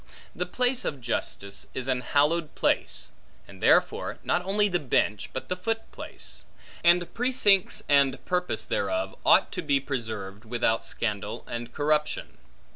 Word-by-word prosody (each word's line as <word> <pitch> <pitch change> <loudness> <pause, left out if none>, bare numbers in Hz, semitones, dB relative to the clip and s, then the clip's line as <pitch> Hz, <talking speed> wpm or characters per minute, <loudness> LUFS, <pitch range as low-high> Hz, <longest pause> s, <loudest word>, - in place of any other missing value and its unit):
The 180 0 -2
place 250 +5 +1
of 140 - -3
justice 100 -4 -3
is 130 0 -3
an 130 -1 +1
hallowed 150 +4 +1
place; - - 0 0.4
and - - -14
therefore - - +3
not 180 - +1
only 205 +2 +2
the 180 -3 0
bench, 105 -7 0
but 130 - -5
the 180 - -1
foot 225 +4 -2
place; - - -8 0.4
and 175 0 +4
precincts 225 -6 +3
and 140 -2 +4
purprise 180 0 0
thereof, 325 -10 -1
ought - - +5
to - - -3
be 140 -1 +2
preserved 110 -7 -4
without 115 -1 0
scandal 105 -2 -3
and 120 0 -5
corruption. 150 +2 -1
145 Hz, 145 wpm, -27 LUFS, 120-180 Hz, 0.4 s, ought